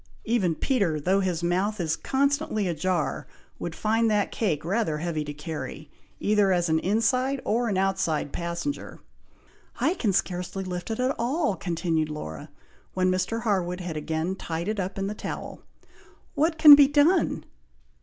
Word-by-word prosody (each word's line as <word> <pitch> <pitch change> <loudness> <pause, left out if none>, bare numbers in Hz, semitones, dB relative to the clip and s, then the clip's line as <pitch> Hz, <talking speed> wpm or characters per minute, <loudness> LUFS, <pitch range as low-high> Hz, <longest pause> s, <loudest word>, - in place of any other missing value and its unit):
"Even 200 -8 +1
Peter, 195 - 0
though 185 +6 +2
his 180 -3 -1
mouth 190 +5 0
is 160 -2 0
constantly 280 -5 0
ajar, 175 0 -1 0.3
would 170 -1 -5
find 225 +1 +1
that 210 -1 +1
cake 165 -10 -1
rather 185 -4 0
heavy 160 -1 -2
to 145 - -6
carry, 150 -1 -7 0.3
either 205 -2 +3
as 175 -2 +1
an 160 0 +3
inside 255 +8 +1
or 235 +2 +1
an 195 - 0
outside 190 -6 0
passenger." 170 +12 -4 0.8
"I 330 - +2
can 225 - 0
scarcely 185 0 -2
lift 180 0 -5
it 225 - -3
at 255 +2 +1
all!" 255 - 0
continued 165 -3 -1
Laura, 150 - -7 0.5
when 185 0 +2
Mr. 185 +5 -1
Harwood 185 -5 0
had 175 -3 -5
again 160 +4 -2
tied 170 -1 -4
it 215 -1 -2
up 190 +1 -3
in 195 - -1
the 205 - -3
towel; - - -6 0.7
"what 315 +2 +1
can 300 -2 +11
be 285 -1 +8
done?" 295 +6 +2
190 Hz, 160 wpm, -26 LUFS, 170-225 Hz, 0.8 s, can